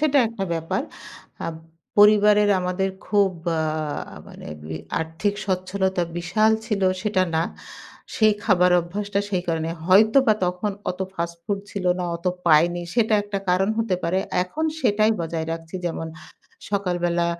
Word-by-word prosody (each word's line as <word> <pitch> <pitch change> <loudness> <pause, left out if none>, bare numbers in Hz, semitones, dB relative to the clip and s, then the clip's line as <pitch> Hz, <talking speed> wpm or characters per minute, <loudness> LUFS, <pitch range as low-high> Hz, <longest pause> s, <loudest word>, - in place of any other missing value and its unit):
সেটাএকটা 245 -9 +2
ব্যাপার। 165 0 -2 0.6
আ - - -2 0.5
পরিবারের 210 0 +6
আমাদের 180 +1 -1 0.2
খুব 205 -2 +3 0.2
ব্যা 165 -2 +1 0.7
মানে - - -11 0.2
বি 80 +1 -6 0.2
আর্থিক 165 +6 -2
স্বচ্ছলতা 190 0 0
বিশাল 180 +6 +2 0.2
ছিল 210 -4 -1 0.2
সেটা 200 -3 +1
না। 160 - +2 0.7
সেই 215 -2 +5
খাবার 180 -3 +4
অভ্যাসটা 200 +4 -3
সেই 185 -3 0
কারণে 165 0 -1 0.2
হয়তো 215 +7 +6
বা 215 - +5
তখন 180 +3 -1 0.2
অত 180 - -8
ফাস্টফুড 170 +3 -3
ছিল 195 -3 -5
না, 180 - -2
অত 170 +2 -10 0.2
পাইনি 170 +2 +4
সেটা 220 -2 +3
একটা 205 -1 -4
কারণ 185 +2 +2
হতে 225 -5 +1
পারে। 175 +3 +1 0.2
এখন 300 +13 -3 0.2
সেটাই 215 -3 +3
বজায় 165 -1 -3
রাখছি 165 +2 -8
যেমন 165 -1 -3
অ্যা 155 - -14 0.5
সকালবেলা, 175 -3 0
185 Hz, 140 wpm, -23 LUFS, 170-210 Hz, 0.7 s, পরিবারের